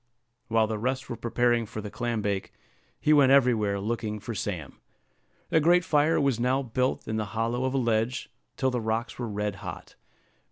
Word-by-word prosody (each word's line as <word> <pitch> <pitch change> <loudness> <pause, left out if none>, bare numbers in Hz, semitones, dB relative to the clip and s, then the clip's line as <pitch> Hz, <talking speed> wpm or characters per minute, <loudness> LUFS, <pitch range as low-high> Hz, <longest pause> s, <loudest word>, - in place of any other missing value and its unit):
While 115 -1 +3
the 110 -1 -3
rest 130 +3 -2
were - - -2
preparing 120 0 +1
for 110 - -6
the 105 -1 -6
clam 120 -1 -2
bake, 100 -2 -2 0.5
he 155 - +3
went 140 -3 +6
everywhere 115 -7 +3
looking 105 0 -3
for 115 +3 -6
Sam. 90 -8 -5 0.7
A 160 - +5
great 175 +3 +4
fire 150 +2 +3
was 135 -5 +1
now 130 +3 +1
built 125 +2 -1
in 110 0 -1
the 110 - -1
hollow 120 +3 0
of 130 +1 -1
a - - +3
ledge, 120 0 0 0.3
till 130 0 +1
the 125 -2 -1
rocks 110 +3 -2
were 120 -2 -3
red 105 -1 -2
hot. - - -8
115 Hz, 190 wpm, -27 LUFS, 110-130 Hz, 0.7 s, went